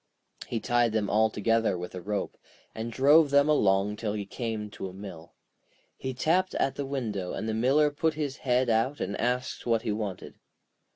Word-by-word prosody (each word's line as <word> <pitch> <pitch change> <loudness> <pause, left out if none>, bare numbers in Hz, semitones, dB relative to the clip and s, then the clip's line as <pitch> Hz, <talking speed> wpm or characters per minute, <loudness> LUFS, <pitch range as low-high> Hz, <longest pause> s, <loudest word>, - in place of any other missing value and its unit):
He 115 - -2
tied 120 0 +2
them 105 -2 0
all 110 +1 +4
together 115 -1 +1
with 90 0 -7
a 90 - -6
rope, 105 +3 -3 0.4
and 115 +1 -5
drove 145 +5 +5
them 140 +1 +4
along 105 -7 +2
till 105 -2 -2
he 105 -2 -3
came 110 -1 -4
to 95 - -6
a - - -12
mill. 95 -4 -10 0.6
He 130 - -4
tapped 180 +8 +1
at 135 - +1
the 140 - -4
window, 110 -9 -3
and 110 - -4
the 110 - -1
Miller 135 +7 +3
put 155 +2 0
his 145 -3 -3
head 125 0 +1
out 115 +5 +1
and 100 +2 -2
asked 125 +2 -2
what 115 -1 +2
he 110 - -1
wanted. 105 -3 -5
115 Hz, 190 wpm, -28 LUFS, 105-135 Hz, 0.6 s, drove